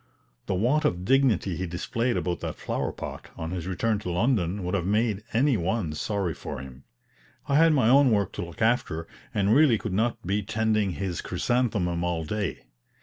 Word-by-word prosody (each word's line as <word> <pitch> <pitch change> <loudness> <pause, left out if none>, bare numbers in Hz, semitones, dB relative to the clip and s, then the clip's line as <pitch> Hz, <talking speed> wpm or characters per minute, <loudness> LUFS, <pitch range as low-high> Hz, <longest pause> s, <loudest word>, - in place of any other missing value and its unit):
The - - 0
want 125 +11 +2
of 90 +1 0
dignity 115 - +2
he 95 - -3
displayed 115 +8 -1
about 90 -1 -2
that - - -4
flower - - -2
pot, - - -8
on 80 0 -4
his 90 -2 -4
return 105 +3 0
to 100 - -5
London, 95 -1 +1
would 90 - -3
have 90 -3 0
made 105 0 +1
any 130 +2 +3
one 90 -2 -1
sorry 95 +1 -2
for 75 0 -7
him. 65 0 -11 0.6
I 140 - +3
had 165 +1 +6
my 130 -6 +3
own 135 +2 +6
work 100 -4 +1
to - - -5
look 85 +4 -5
after, 95 -8 +1 0.2
and 100 +1 +2
really 140 -4 +5
could 105 -2 -5
not 115 +5 +1
be 100 +3 0
tending 110 -2 0
his 95 -3 -3
chrysanthemum 105 -9 0
all 85 -2 -1
day. 105 +1 -3
100 Hz, 190 wpm, -26 LUFS, 90-115 Hz, 0.6 s, had